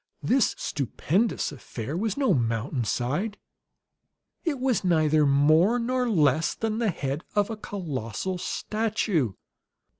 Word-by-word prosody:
This 260 -2 +2
stupendous 165 - -1
affair 130 -1 -6
was 210 +2 -1
no 270 -8 +3
mountainside; 125 - -1 1.1
it 300 -6 -1
was 255 -4 +1
neither 155 -4 +3
more 155 +10 +4
nor 250 +1 0
less 155 - +2
than 220 0 -2
the 230 -3 +2
head 140 -3 -3
of 205 +1 +2
a - - -3
colossal 180 - -4
statue! 210 - -1
175 Hz, 115 wpm, -26 LUFS, 140-220 Hz, 1.1 s, more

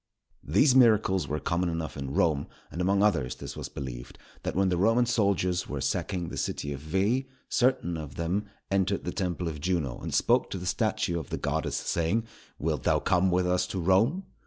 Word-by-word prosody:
These 105 - +4
miracles 110 - +4
were 75 +2 -2
common 85 +2 0
enough 80 -1 -4
in 70 -1 -5
Rome, 75 -3 +2 0.2
and 85 - -4
among 100 +2 +3
others 85 -12 +1
this - - -8
was - - -6
believed, - - -7 0.2
that - - -3
when 95 0 +3
the 90 - +1
Roman 115 +6 +4
soldiers 100 -6 +1
were 70 - -3
sacking 85 +6 -2
the - - -6
city 70 0 -2
of 70 - -6
Veii, 100 - 0 0.2
certain 120 -10 +1
of 75 -3 -7
them 90 +5 -1 0.2
entered 95 0 +1
the 90 - -3
temple 90 -2 -2
of 75 -3 -5
Juno 80 -7 -1
and - - -5
spoke - - +3
to - - -4
the 90 - -6
statue 105 -3 0
of 80 - -8
the - - -2
goddess, - - -1
saying, 90 +7 0 0.3
"_Wilt 75 -2 -1
thou - - +3
come 90 +1 +2
with 90 0 +2
us 90 0 +1
to 95 - -3
Rome? 105 - +3
90 Hz, 200 wpm, -28 LUFS, 80-100 Hz, 0.3 s, These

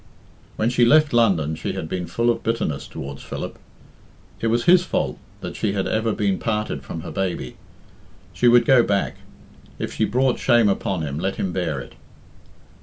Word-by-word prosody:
When 110 +2 0
she 120 -1 +3
left 150 +4 +5
London 95 -10 +3
she 80 - -4
had 80 - -4
been 90 +1 -4
full 120 +1 +1
of - - -3
bitterness 110 -11 -2
towards 70 0 -7
Philip. - - -6 0.8
It 115 - -1
was 120 +1 +1
his 180 0 +6
fault 185 - -2 0.2
that - - -6
she 100 - -1
had 95 -2 -1
ever 110 +1 0
been 100 -3 0
parted 105 - -2
from 80 +4 -7
her - - -7
baby. 90 -10 -3 0.8
She 120 - +2
would 120 0 +6
go 130 -1 +6
back. 100 -3 0 0.6
If - - -4
she - - +1
brought 130 +2 +1
shame 120 -4 +4
upon 95 -3 -1
him, 70 0 -3
let 95 +3 -1
him 95 -2 -2
bear 80 -7 -1
it. - - -10
105 Hz, 180 wpm, -22 LUFS, 85-120 Hz, 0.8 s, his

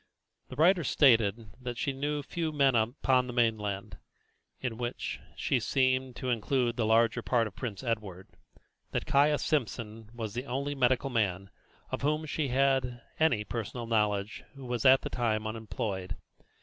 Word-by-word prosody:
The - - -8
writer 170 +4 +4
stated 115 -6 +3
that 125 -1 -5
she 140 - -1
knew 145 +2 -2
few 165 +1 -3
men 140 -3 +3
upon 125 +3 +2
the 125 - -5
mainland 105 - -1 0.6
in 120 -3 -4
which 120 0 -4 0.2
she - - +1
seemed 130 -1 +1
to 130 - -2
include 120 +1 0
the 115 -3 0
larger 115 +1 +3
island 120 -2 +3
of 95 - -25
Prince 115 -2 -5
Edward 105 -6 -4 0.6
that - - -1
Caius 145 +1 +3
Simpson 115 -6 -2
was 115 -3 -5
the 125 +4 -4
only 140 +3 -2
medical 130 0 +1
man 95 -5 -1 0.4
of - - -3
whom 150 +2 0
she 150 0 -2
had 130 -2 +1 0.2
any 140 -10 +3
personal 115 +2 -5
knowledge 105 -2 0
who 135 -1 -10
was 120 +1 -3
at 130 0 +7
that - - -4
time 110 -3 0
unemployed. 105 -4 -4
120 Hz, 160 wpm, -30 LUFS, 110-135 Hz, 0.6 s, at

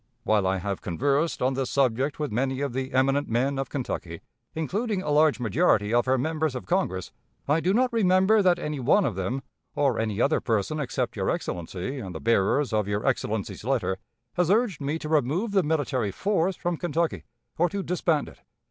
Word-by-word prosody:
"While 105 -3 +2
I 95 +1 +1
have 100 +1 -3
conversed 140 - 0
on 130 +1 +2
this 130 -1 -2
subject 135 +1 +1
with 150 -5 -3
many 130 +4 -1
of 140 -3 -2
the 130 +1 -3
eminent 135 +2 +2
men 135 +4 0
of 135 - -3
Kentucky, 90 - -4 0.3
including 195 +5 -1
a 150 - -2
large 150 -1 +4
majority 115 - +2
of 120 +1 +3
her 130 +1 +3
members 155 +1 -1
of 125 - -5
Congress, 175 - -1 0.4
I 150 +3 +3
do 180 +3 +1
not 250 +4 +2
remember 195 0 +4
that 180 -2 +4
any 150 -2 -4
one 155 +10 +3
of 115 - 0
them, 95 +9 -3 0.3
or 135 -5 +1
any 110 -2 -1
other 140 +5 +3
person 115 +5 -1
except 145 - -2
your - - -1
Excellency 90 - -3
and 95 -7 -7
the - - -4
bearers 115 - +2
of 105 -2 +1
your 105 0 -2
Excellency's - - -1
letter, 95 0 0 0.3
has 175 -2 +1
urged 205 -6 +2
me 145 +3 -1
to 155 - -6
remove 155 - +1
the 200 -1 +4
military 145 - 0
force 190 - 0
from 175 0 -2
Kentucky, 170 -1 -1 0.4
or 175 +1 +3
to 200 +3 -3
disband 170 -4 0
it. - - -14
140 Hz, 195 wpm, -26 LUFS, 120-170 Hz, 0.4 s, large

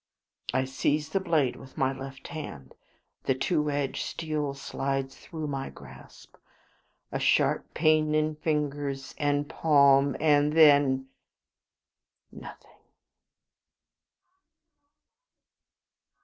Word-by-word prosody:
I 130 0 +1
seize 145 +3 -1
the 195 - 0
blade 160 -9 +1
with 130 - -14
my 135 0 +1
left 135 0 -9
hand; 75 - -8 0.5
the 135 - +2
two 150 +2 0
edged 140 -2 -2
steel 150 -3 -3
slides 135 0 -3
through 160 -2 -7
my 135 -2 -4
grasp; - - -15 0.7
a - - -2
sharp - - +2
pain 155 -1 +3
in 155 0 +1
fingers 145 -3 -2
and 145 -1 0
palm; 140 -3 +4
and 150 -1 +3
then 145 -4 +5 1.2
nothing. - - -13
145 Hz, 95 wpm, -27 LUFS, 135-155 Hz, 1.2 s, then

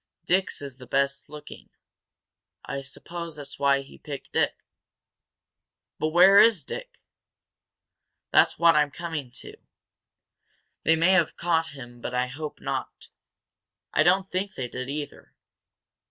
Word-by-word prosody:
Dick's 185 -4 0
is 135 -3 -8
the 125 - -12
best 140 +2 0
looking. 150 0 -11 1.0
I 140 - -4
suppose 170 +4 -8
that's 145 -2 -10
why 140 -1 +3
he 135 - -15
picked 145 -3 -8
it." - - +2 1.4
"But 155 - +1
where 185 +5 +7
is 215 -9 +5
Dick?" - - -8 1.3
"That's - - +4
what 170 -1 +5
I'm 150 -1 +3
coming 160 -3 -5
to. - - -10 1.2
They 160 - +4
may 165 +3 +4
have 180 -4 +2
caught 165 -1 +1
him 120 -2 -11
but 125 - -4
I 125 0 +2
hope 150 +4 -7
not. - - -5 0.8
I - - +3
don't 190 +2 +3
think 190 +2 -2
they 125 - -3
did, 130 +2 -6
either. 145 +1 -6
150 Hz, 135 wpm, -26 LUFS, 140-175 Hz, 1.4 s, where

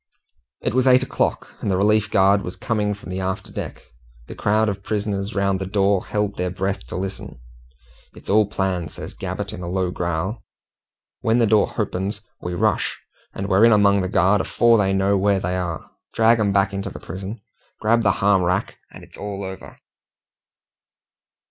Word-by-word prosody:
It - - -1
was 130 +1 +2
eight 130 0 +6
o'clock - - -2
and - - -2
the 95 - +2
relief 105 +1 +3
guard 100 +1 +4
was 90 - -6
coming 105 -2 -1
from 100 -2 -10
the 95 - -3
after 95 0 -3
deck. - - -6 0.4
The - - -9
crowd 110 +1 +1
of 100 -1 -2
prisoners 100 0 -2
round 100 -1 +1
the 95 - -4
door 100 -1 +1
held 105 -1 -1
their 90 0 -1
breath 95 -6 -3
to - - -7
listen. 95 -5 -5 0.8
"It's - - -14
all 105 +1 +4
planned," 95 -4 -2
says - - -8
Gabbett, - - -5
in - - -7
a 85 - -5
low 90 -1 -1
growl. 90 +6 -2 0.8
"W'en 115 +1 +2
the 120 - +4
door 105 -1 +4
h'opens 100 +3 -3 0.2
we 90 0 -4
rush, - - 0 0.4
and 100 - -3
we're 95 +2 +4
in 115 - +7
among 100 -2 +4
the 95 - -2
guard 95 +4 +3
afore 115 -1 +3
they 95 -1 +2
know 95 +1 +2
where 100 0 +2
they 90 0 -2
are. 90 -4 -4 0.2
Drag 115 +1 +4
'em 105 -2 +2
back 100 0 +2
into 100 0 -3
the - - -9
prison, 95 +5 -7 0.4
grab 115 +2 +3
the 105 -3 +3
h'arm 100 -2 +4
rack, 90 +3 -1
and - - -12
it's - - -15
all 100 -1 -5
over." 95 0 -9
100 Hz, 185 wpm, -22 LUFS, 95-105 Hz, 0.8 s, in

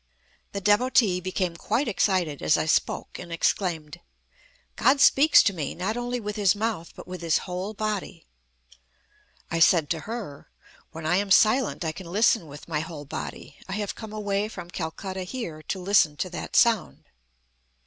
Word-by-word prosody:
The 200 - -3
Devotee 210 -2 +3
became 185 -1 -2
quite 225 - -1
excited 185 -8 0
as - - +3
I - - 0
spoke, 155 - 0
and 175 -1 -9
exclaimed: 165 -2 -1 0.8
"God 275 +1 +3
speaks 280 +3 +6
to 200 - +2
me, 155 -6 -4
not 190 +6 -2
only 245 0 -2
with 210 -2 -5
His 200 -2 +3
mouth, 210 -6 -3
but - - -10
with 180 -1 -7
His 165 -2 +2
whole 185 +4 -4
body." 205 -5 -4 1.3
I 165 - 0
said 160 -2 +4
to 165 - 0
her: 215 -12 -7 0.4
"When 160 -1 -8
I 175 +3 +2
am 200 0 -1
silent 215 -1 +3
I 160 - 0
can 170 +1 -10
listen 210 -2 +3
with 145 +1 -11
my 155 -3 -1
whole 155 -2 -7
body. 140 - -7
I - - -3
have 205 0 -3
come 220 -2 -9
away 205 -1 -1
from 175 -5 -9
Calcutta 185 +4 -5
here 180 -6 -6
to - - -2
listen 180 -5 +3
to 185 - -3
that - - -6
sound." 230 -4 +3
185 Hz, 170 wpm, -26 LUFS, 165-215 Hz, 1.3 s, speaks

